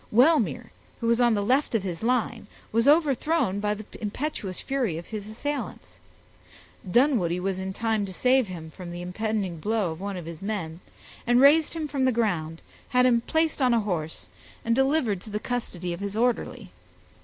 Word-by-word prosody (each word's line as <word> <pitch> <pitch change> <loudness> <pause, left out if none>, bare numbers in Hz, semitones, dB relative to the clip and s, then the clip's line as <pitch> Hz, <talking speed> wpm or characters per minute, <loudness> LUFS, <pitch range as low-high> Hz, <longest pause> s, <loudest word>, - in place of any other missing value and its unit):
Wellmere, 240 - +3 0.3
who - - -4
was 235 +1 +3
on 240 -2 +4
the 205 -1 -1
left 260 +2 +2
of 215 - +1
his 175 -4 -4
line, 235 -2 0 0.2
was 230 +4 +2
overthrown 295 - +3
by 210 0 0
the 215 0 -9 0.2
impetuous 210 -3 -3
fury 255 - -1
of 170 - -7
his 210 -2 -6
assailants. 290 +7 -5 0.9
Dunwoodie 205 - +3
was 190 0 -2
in 190 0 -3
time 220 0 -1
to - - -7
save 255 +4 +3
him 165 -4 -8
from 180 0 -9
the 175 0 -6
impending 195 -2 -2
blow 210 -1 0
of 160 +3 -8
one 200 -1 -4
of 175 - -7
his 165 -1 -8
men, 185 -6 -4 0.5
and 245 +1 +5
raised 300 +4 +5
him 315 -2 -2
from 275 -3 0
the 260 - +4
ground, 175 -9 -1 0.3
had 250 0 +4
him 235 -2 +4
placed 320 +3 0
on 250 -2 +4
a 230 - +3
horse, 165 -6 -4 0.4
and 230 - +2
delivered 265 - +2
to 220 - -10
the 210 0 -2
custody 190 -8 -3
of 170 - -6
his 200 +1 -4
orderly. 245 -2 -1
220 Hz, 190 wpm, -26 LUFS, 185-250 Hz, 0.9 s, and